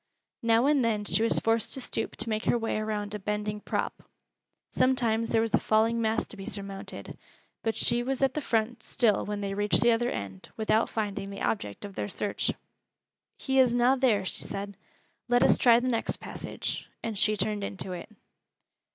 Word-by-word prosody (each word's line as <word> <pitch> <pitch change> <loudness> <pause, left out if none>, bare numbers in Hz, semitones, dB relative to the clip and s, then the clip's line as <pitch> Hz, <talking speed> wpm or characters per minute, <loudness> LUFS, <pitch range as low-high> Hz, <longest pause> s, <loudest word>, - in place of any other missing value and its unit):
Now 230 +1 +3
and 285 -2 +3
then 215 -3 0
she 215 - +1
was 230 - +2
forced 225 -1 +1
to 265 - -6
stoop 225 - -2
to - - +1
make 215 0 -1
her - - +3
way 225 -2 -1
around 210 -1 -2
a 210 - -4
bending 210 +1 -2
prop; - - -3 0.7
sometimes 235 -3 +2
there 225 - +3
was 225 -1 -2
a - - +5
falling 225 +2 +2
mass 220 +1 +1
to - - -12
be 195 - -8
surmounted: 195 -1 -6 0.4
but 225 -1 -1
she 240 0 +2
was 265 +2 -1
at 265 -1 +3
the 300 - -2
front 230 -2 -1
still 220 -2 +2
when 205 0 -4
they 200 -1 -2
reached 205 +1 +2
the 235 - +5
other 240 +1 +1
end, 95 -3 -6
without 220 0 +2
finding 205 -2 -3
the 200 - -6
object 105 - -2
of 200 - -8
their 205 - -3
search. 205 +1 -1
"It - - -1 0.8
he 265 -1 +1
is 250 -2 +5
na 245 +2 +4
there," 235 -7 +2
she - - -2
said. 200 0 -5 0.5
"Let 245 0 +4
us - - +6
try 235 -2 +5
th' - - -6
next 245 -3 -1
passage," - - -5
and 225 -2 -3
she 210 +1 +3
turned 205 +1 0
into 195 -1 -3
it. 180 +3 -7
220 Hz, 200 wpm, -28 LUFS, 205-235 Hz, 0.8 s, us